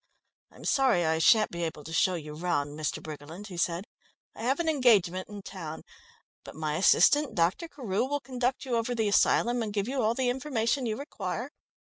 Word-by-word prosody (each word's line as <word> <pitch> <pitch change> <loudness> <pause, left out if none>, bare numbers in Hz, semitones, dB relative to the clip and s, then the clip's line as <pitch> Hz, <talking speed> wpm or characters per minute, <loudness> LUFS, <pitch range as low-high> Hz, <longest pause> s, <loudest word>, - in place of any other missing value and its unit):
"I'm - - -13
sorry 260 - +3
I 160 0 +1
shan't 215 +6 +5
be 170 - -5
able 160 -2 -4
to 160 - -8
show 185 +2 +3
you 150 -3 -7
round, 150 -3 -1
Mr. 150 +1 -3
Briggerland," 155 +7 -9
he 180 - -8
said. 170 +2 -1 0.5
"I - - -9
have 260 +6 0
an 340 - -1
engagement 215 - +3
in 205 -1 -8
town, 160 -6 -7 0.6
but - - -11
my 155 -1 -2
assistant, 290 - +4
Dr. 180 - +1
Carew, 245 -9 -2
will 290 +2 -1
conduct 255 -1 -2
you 245 -3 0
over 230 +2 -1
the 220 -2 +1
asylum 240 +4 +3
and 215 -2 -3
give 205 0 -1
you 265 0 -1
all 225 +1 +1
the 255 -1 +1
information 250 -1 -1
you 215 - -2
require. 280 +2 -5
215 Hz, 195 wpm, -28 LUFS, 170-255 Hz, 0.6 s, shan't